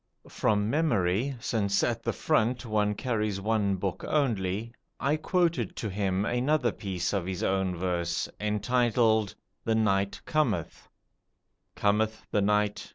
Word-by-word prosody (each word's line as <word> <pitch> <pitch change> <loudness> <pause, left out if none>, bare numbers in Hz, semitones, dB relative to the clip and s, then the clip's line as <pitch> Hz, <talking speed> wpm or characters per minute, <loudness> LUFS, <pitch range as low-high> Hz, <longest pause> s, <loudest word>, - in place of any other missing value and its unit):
From 105 -1 +1
memory 120 - +1
since 100 -4 0
at 115 -1 0
the - - -1
front 125 -4 +1
one 105 -2 +1
carries 105 -4 -1
one 105 -1 +1
book 95 0 -3
only 115 -6 0 0.3
I 140 +3 +2
quoted 165 - 0
to 110 - -4
him 95 0 0
another 125 +1 +1
piece 95 -4 -3
of 95 -3 -1
his 95 -2 -3
own 95 -1 +1
verse, 85 -1 -1
entitled 110 0 +2 0.3
"The 115 - +1
Night 100 -3 +1
Cometh": 150 - -1 0.9
"Cometh 110 +1 +1
the 105 - +2
night. 105 0 +1
105 Hz, 130 wpm, -28 LUFS, 100-120 Hz, 0.9 s, I